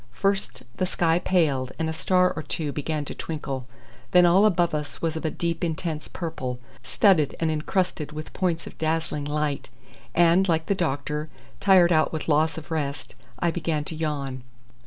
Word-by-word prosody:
First 195 +6 -1
the 185 - 0
sky 170 -2 +2
paled 145 -9 +1
and 160 0 -1
a 160 - -2
star 180 +3 +2
or 155 - -3
two 155 -1 -2
began 150 +1 -2
to - - -5
twinkle, 140 -5 -5 0.5
then 180 -1 +7
all 190 +5 +6
above 175 -4 +2
us 150 -1 -4
was 165 -1 -1
of 160 - -4
a - - +2
deep 170 +1 -2
intense 160 -2 -2
purple, 130 -8 -4 0.2
studded 160 - +3
and 160 -1 +1
encrusted 155 0 -1
with 155 +1 -7
points 170 -3 -1
of - - -11
dazzling 160 -2 -1
light, 150 -1 -2 0.5
and, 175 +3 +5
like 160 -1 +2
the 200 - +1
doctor, 150 -3 -2 0.3
tired 185 -3 +6
out 155 -2 +3
with 160 - -4
loss 160 +1 +2
of 160 +1 -9
rest, 145 -3 -3 0.2
I 170 +6 +1
began 165 -3 -1
to 160 - -6
yawn. 140 -5 -3
160 Hz, 180 wpm, -25 LUFS, 150-175 Hz, 0.5 s, then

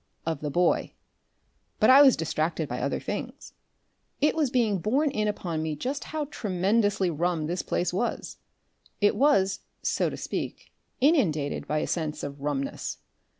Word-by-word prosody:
of 160 -3 -2
the 150 - -2
boy. 175 +4 +1 0.9
But 215 - +6
I 270 +2 +9
was 270 -3 +7
distracted 160 0 -1
by - - -4
other - - -1
things. - - -6 0.7
It 300 - +3
was 305 -5 +1
being 225 -6 +1
borne 270 - +1
in 215 -5 0
upon 170 -6 -2
me 155 -1 -2
just 265 - -4
how 310 -1 -3
tremendously 200 -1 +1
rum 165 0 -1
this 175 +3 -2
place 175 0 -1
was; 235 +6 -2 0.6
it 205 -1 +3
was, 200 -10 +3 0.2
so - - +1
to - - -7
speak, - - -5 0.3
inundated 185 - +2
by 155 - 0
a - - 0
sense 155 -3 -3
of 140 0 -6
rumness. 140 -1 -3
185 Hz, 155 wpm, -27 LUFS, 155-240 Hz, 0.9 s, I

